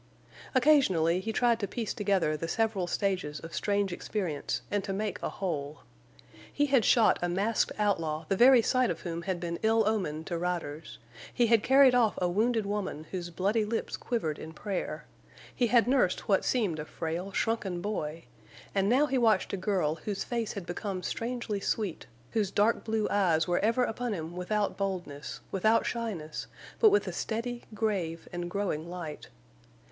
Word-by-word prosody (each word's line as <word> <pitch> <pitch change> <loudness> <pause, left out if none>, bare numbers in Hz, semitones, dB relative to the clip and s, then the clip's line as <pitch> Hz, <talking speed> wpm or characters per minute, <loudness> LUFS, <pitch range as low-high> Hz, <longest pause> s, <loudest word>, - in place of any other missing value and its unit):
Occasionally 195 - +4
he 225 +4 -3
tried 235 0 +2
to 200 - -2
piece 225 +2 -3
together 195 -8 +1
the 165 +2 -4
several 215 -2 0
stages 180 -6 -1
of 165 0 -10
strange 200 -2 0
experience 175 -6 -3
and 205 -1 0
to 195 - -4
make 205 0 -3
a - - -2
whole. 150 -6 -4 0.7
He 290 - +2
had 270 -5 +3
shot 225 0 +4
a 175 - 0
masked 200 +6 +1
outlaw 165 -7 0
the 195 - +1
very 245 +2 +7
sight 255 +1 +2
of - - -3
whom 170 -1 -4
had 185 0 -2
been 170 -1 -4
ill 220 -1 +3
omen 180 -8 -1
to 170 0 -3
riders; 165 -3 -4 0.3
he 240 - +2
had 230 -1 +4
carried 265 +2 +6
off 235 -4 +3
a 180 - +1
wounded 220 +4 +1
woman 200 -6 -3
whose 175 -2 -4
bloody 200 +6 +1
lips 225 +2 -2
quivered 160 -11 -2
in 160 - -8
prayer; 195 +1 -4 0.5
he 245 - +1
had 235 0 +4
nursed 250 -9 +2
what 195 -2 +3
seemed 205 -11 0
a 150 - -4
frail, 170 +5 -4
shrunken 200 -4 -1
boy; 165 -5 -3 0.5
and 195 0 +2
now 265 +5 +4
he 270 -3 0
watched 220 -6 +2
a - - +2
girl 185 -5 0
whose 205 -2 -2
face 235 -3 -2
had 200 -4 -6
become 185 +1 -4
strangely 235 -3 -3
sweet, 200 -3 -2 0.2
whose 210 -4 +1
dark 210 +3 +2
blue 220 -1 0
eyes 175 -5 +2
were 175 0 +2
ever 230 +4 +2
upon 245 0 -2
him 165 -2 -5
without 205 +3 -1
boldness, 175 -7 -4
without 215 +4 +3
shyness, 200 -10 -4 0.3
but 440 - +7
with 405 0 +3
a - - -3
steady, 240 +2 -3
grave, 190 -7 -2
and 175 0 -3
growing 175 -4 -2
light. 170 -4 -7
200 Hz, 175 wpm, -29 LUFS, 175-225 Hz, 0.7 s, very